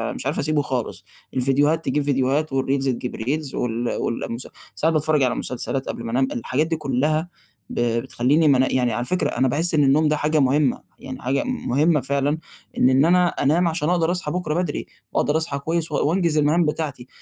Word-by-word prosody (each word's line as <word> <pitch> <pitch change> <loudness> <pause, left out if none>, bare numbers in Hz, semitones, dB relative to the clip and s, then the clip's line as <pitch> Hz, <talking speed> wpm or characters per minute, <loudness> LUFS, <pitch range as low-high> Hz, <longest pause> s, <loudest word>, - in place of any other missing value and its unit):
مش - - -7
عارف - - -1
أسيبه 150 0 +1
خالص، 130 -4 -4 0.3
الفيديوهات 145 +5 +1
تجيب 150 - 0
فيديوهات 140 +2 0
والreels 135 0 0
تجيب 125 -1 -2
reels 140 +5 -3
وال 120 0 -2
وال 115 - -2
المس 115 +3 -5 0.3
ساعات 160 +1 +1
باتفرَّج 150 -2 +2
على 125 - +1
مسلسلات 130 +2 -3
قبل 115 - -5
ما 115 - -4
أنام، 130 +2 +2
الحاجات 130 +6 -1
دي 165 - -1
كلّها 155 +3 0 0.4
ب - - -4 0.2
بتخلّيني 135 +5 +2
ما 140 -3 +5
أنا 130 - +2
يعني 125 -3 +1
على 120 +2 -2
فكرة 185 +5 0
أنا 130 +2 +1
باحس 160 +6 0
إن 150 -2 +4
النوم 150 +3 +4
ده 150 0 +1
حاجة 155 +1 +1
مهمة، 140 0 +2 0.2
يعني 130 -1 -8
حاجة 135 +2 0
مهمة 155 - +1
فعلًا 140 +3 0 0.4
إن 125 - +4
إن 135 +3 +4
أنا 180 +1 +4
أنام 170 +3 +1
عشان 160 -1 -1
أقدَر 175 -1 +2
أصحى 180 -5 -2
بُكرة 180 -4 -2
بدري 180 - -3 0.3
وأقدَر 150 +2 +1
أصحى 140 -3 -2
كويس 165 +2 -2
و - - -1
وأنجِز 170 -3 +1
المهام 155 +3 +3
بتاعتي 150 -5 -3
145 Hz, 200 wpm, -22 LUFS, 130-160 Hz, 0.4 s, ما